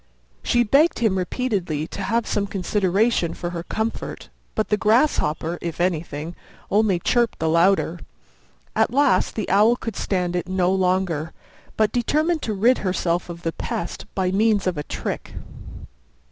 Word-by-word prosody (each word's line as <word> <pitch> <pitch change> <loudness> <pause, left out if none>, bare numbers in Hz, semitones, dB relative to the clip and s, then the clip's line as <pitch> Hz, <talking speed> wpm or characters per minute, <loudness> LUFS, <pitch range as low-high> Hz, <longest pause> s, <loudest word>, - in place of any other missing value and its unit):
She 240 0 +2
begged 280 +9 +3
him 220 -5 +1
repeatedly 185 - -1
to - - -6
have 230 0 0
some 200 -1 -1
consideration 195 0 +1
for 175 - -4
her 170 -1 -4
comfort, 220 +6 -4 0.3
but 215 - -1
the 210 - +3
Grasshopper, 205 - +1
if 170 -1 -5
anything, 165 -2 -2 0.4
only 205 -2 +3
chirped 235 +6 +1
the 160 - -1
louder. 170 +1 +2 0.8
At 220 - +3
last 245 -7 +2
the 215 - -2
Owl 210 +5 +4
could 225 -2 -6
stand 180 -2 -1
it 175 - -2
no 185 0 +2
longer, 180 -4 0 0.4
but 215 -1 +3
determined 310 +7 +1
to 220 - -2
rid 235 +6 +3
herself 180 -2 -1
of 170 0 -8
the 165 - -1
pest 170 - -5
by 185 -2 0
means 210 0 +2
of 185 -2 0
a 150 - -3
trick. - - -5
190 Hz, 155 wpm, -23 LUFS, 175-220 Hz, 0.8 s, Owl